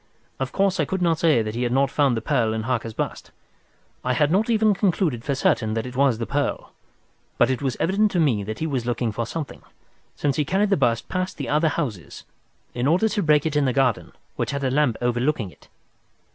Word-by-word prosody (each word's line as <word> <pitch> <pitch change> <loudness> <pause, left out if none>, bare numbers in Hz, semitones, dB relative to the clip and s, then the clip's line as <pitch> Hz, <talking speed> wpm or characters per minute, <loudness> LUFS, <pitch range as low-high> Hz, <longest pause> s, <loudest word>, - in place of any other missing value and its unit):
Of 130 -1 -2
course, 195 -1 +1
I - - +2
could 190 -1 -2
not 165 -2 +2
say 155 -9 +3
that 110 0 -4
he 120 - -3
had 120 -1 0
not 135 +1 +2
found 140 -5 +2
the 110 - -4
pearl 110 -2 +1
in 110 - -3
Harker's 115 -2 -2
bust. - - -4 0.7
I 125 - 0
had 145 +4 +2
not 210 +6 +2
even 220 -2 +3
concluded 180 - 0
for 140 +1 -1
certain 110 -4 +1
that 115 - -2
it 125 0 -8
was 135 -3 +3
the 115 - -3
pearl, 140 +2 -2 0.7
but - - +4
it 130 - -2
was 135 -3 -2
evident 205 +4 +2
to 180 - +1
me 125 -11 +2
that 110 +2 -5
he 160 - -2
was 130 -6 -2
looking 120 -1 -1
for 115 +2 -3
something, 160 0 -6 0.5
since 140 -2 -1
he 150 - +2
carried 195 +7 0
the - - +5
bust 115 -5 0
past 185 -1 -3
the 140 - -4
other 155 +2 +2
houses 120 - -4 0.5
in 125 +2 -1
order 180 +8 +3
to 210 - -1
break 150 -4 +3
it 155 -2 -1
in 145 -1 +3
the 130 - +1
garden 130 -4 +1 0.3
which - - -1
had 140 -1 -3
a 130 - +1
lamp 140 -4 +2
overlooking 120 -3 0
it. - - -21
140 Hz, 230 wpm, -23 LUFS, 120-165 Hz, 0.7 s, the